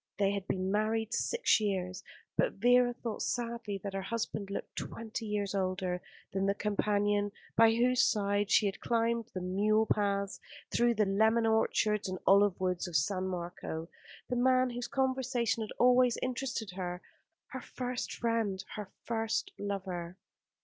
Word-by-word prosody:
They 200 Hz, -1 st, +2 dB
had 200 Hz, -1 st, -3 dB
been 185 Hz, 0 st, -1 dB
married 220 Hz, +2 st, 0 dB
six 475 Hz, -, +2 dB
years; 190 Hz, -3 st, -2 dB, 0.3 s
but -, -, +2 dB
Vera 245 Hz, +3 st, +4 dB
thought 235 Hz, -2 st, -5 dB
sadly 235 Hz, -4 st, -2 dB
that 200 Hz, -1 st, -4 dB
her 195 Hz, -, -2 dB
husband 210 Hz, -1 st, -3 dB
looked 200 Hz, -, -5 dB
twenty 225 Hz, 0 st, -5 dB
years 205 Hz, -2 st, -1 dB
older 185 Hz, -2 st, -1 dB, 0.3 s
than 195 Hz, 0 st, 0 dB
the 200 Hz, -, +2 dB
companion 205 Hz, 0 st, +1 dB, 0.2 s
by 225 Hz, 0 st, +6 dB
whose 250 Hz, +1 st, +3 dB
side 205 Hz, -1 st, +1 dB
she 210 Hz, -, +5 dB
had 195 Hz, -1 st, -2 dB
climbed 230 Hz, -1 st, 0 dB
the 185 Hz, -, -2 dB
mule 210 Hz, +4 st, +2 dB
paths, 200 Hz, -2 st, 0 dB, 0.3 s
through 240 Hz, 0 st, +3 dB
the 215 Hz, -1 st, +3 dB
lemon 220 Hz, +4 st, +3 dB
orchards 215 Hz, -2 st, +2 dB
and 185 Hz, -, -3 dB
olive 200 Hz, -1 st, +5 dB
woods 185 Hz, -1 st, -1 dB
of 175 Hz, -, -7 dB
San 185 Hz, +6 st, +1 dB
Marco, 170 Hz, -2 st, -5 dB, 0.4 s
the 250 Hz, -, -2 dB
man 255 Hz, 0 st, +3 dB
whose 240 Hz, 0 st, -4 dB
conversation 260 Hz, -4 st, 0 dB
had 215 Hz, -, -4 dB
always 250 Hz, -1 st, +5 dB
interested 250 Hz, -4 st, -3 dB
her, 180 Hz, -1 st, -5 dB, 0.5 s
her 260 Hz, -3 st, -6 dB
first 250 Hz, 0 st, -4 dB
friend, 225 Hz, -5 st, -1 dB
her 210 Hz, -3 st, -6 dB, 0.2 s
first 225 Hz, -, -1 dB
lover. 185 Hz, -3 st, -4 dB
210 Hz, 155 wpm, -32 LUFS, 195-235 Hz, 0.5 s, by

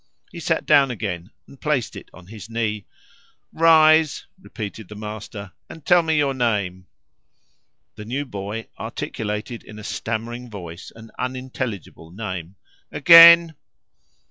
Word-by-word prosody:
He -, -, -9 dB
sat -, -, -1 dB
down 140 Hz, -3 st, +4 dB
again 100 Hz, -6 st, -5 dB, 0.2 s
and 140 Hz, -, -18 dB
placed 135 Hz, -9 st, -1 dB
it -, -, -11 dB
on 90 Hz, -, -15 dB
his 105 Hz, +1 st, -11 dB
knee. 110 Hz, -3 st, -3 dB, 0.7 s
"Rise," 160 Hz, -1 st, +4 dB, 0.2 s
repeated 110 Hz, -, -8 dB
the 105 Hz, -, -10 dB
master, 105 Hz, -2 st, -8 dB, 0.2 s
"and 160 Hz, -, -12 dB
tell 175 Hz, -1 st, +5 dB
me 160 Hz, -1 st, 0 dB
your 140 Hz, -2 st, +1 dB
name." 100 Hz, -8 st, -2 dB, 1.1 s
The 105 Hz, -, -9 dB
new 135 Hz, +6 st, -3 dB
boy 105 Hz, -1 st, -6 dB
articulated 105 Hz, +2 st, -5 dB
in 105 Hz, -, -13 dB
a 105 Hz, -, -10 dB
stammering 120 Hz, +3 st, -5 dB
voice 90 Hz, -4 st, -9 dB
an 115 Hz, 0 st, -14 dB
unintelligible 125 Hz, -9 st, -5 dB
name. 95 Hz, -2 st, -7 dB, 0.4 s
"Again!" 165 Hz, +2 st, +8 dB
115 Hz, 130 wpm, -22 LUFS, 100-140 Hz, 1.1 s, Again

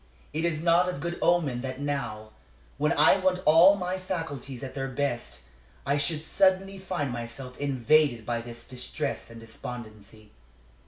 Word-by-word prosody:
It 160 Hz, +2 st, -1 dB
is 160 Hz, -2 st, -1 dB
not 175 Hz, +1 st, +4 dB
of 180 Hz, -, -4 dB
good 170 Hz, +3 st, -4 dB
omen 150 Hz, -8 st, +2 dB
that 130 Hz, 0 st, -5 dB
now, 120 Hz, -7 st, -3 dB, 0.5 s
when 150 Hz, +1 st, +2 dB
I -, -, +5 dB
want 185 Hz, -1 st, 0 dB
all 170 Hz, +6 st, +8 dB
my 185 Hz, -1 st, -3 dB
faculties 160 Hz, -9 st, -5 dB
at 130 Hz, -1 st, -6 dB
their 135 Hz, -1 st, -3 dB
best, 125 Hz, -, -3 dB, 0.4 s
I 140 Hz, +2 st, +1 dB
should 150 Hz, +2 st, -1 dB
suddenly 195 Hz, +1 st, +2 dB
find 180 Hz, -8 st, -3 dB
myself 120 Hz, +2 st, -7 dB
invaded 140 Hz, -2 st, +2 dB
by 120 Hz, 0 st, -1 dB
this 120 Hz, 0 st, -8 dB
distress 125 Hz, -2 st, -4 dB
and 115 Hz, 0 st, -10 dB
despondency. 110 Hz, -2 st, -10 dB
140 Hz, 155 wpm, -27 LUFS, 120-170 Hz, 0.5 s, all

